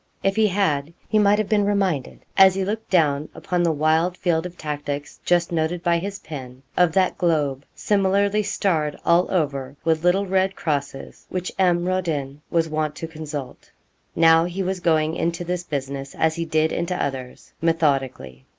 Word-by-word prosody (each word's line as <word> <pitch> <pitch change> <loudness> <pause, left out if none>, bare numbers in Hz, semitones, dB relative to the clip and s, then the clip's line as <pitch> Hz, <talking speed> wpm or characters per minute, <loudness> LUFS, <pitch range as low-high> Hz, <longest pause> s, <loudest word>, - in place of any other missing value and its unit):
If 195 0 +1
he 220 -1 +4
had 170 -6 0
he 215 - +2
might 205 0 +4
have 215 -1 0
been 210 -2 +2
reminded, 195 -9 -1
as 190 -1 +7
he 190 -1 -1
looked 215 +3 -4
down 150 -5 +2
upon 180 -1 -1
the 170 -1 +3
wild 160 +4 +1
field 170 -1 0
of 180 0 -14
tactics 145 -1 -5
just 175 -1 +2
noted 170 +1 -1
by 170 -1 +2
his 200 +3 -5
pen, 130 -6 -9
of 180 -3 +3
that 190 -1 +1
globe 145 -6 0
similarly 200 +1 +2
starred 160 -7 0
all 170 +2 +4
over 140 -6 -1
with 160 0 +1
little 185 +3 +3
red 190 0 +1
crosses, 140 -3 -4
which 185 0 -3
M. 175 -2 +3
Rodin 155 -7 -2
was 165 -1 +1
wont 155 -1 -2
to 165 - -5
consult. 150 -4 -7 0.5
Now 165 0 +5
he 180 +2 -3
was 190 0 -2
going 160 -2 +1
into 170 +1 -1
this 180 0 -2
business 140 -2 -5
as 160 0 +2
he 170 -1 -2
did 155 0 +1
into 170 +1 -2
others, 130 -5 -5
methodically. 135 - 0
165 Hz, 175 wpm, -23 LUFS, 150-185 Hz, 0.5 s, as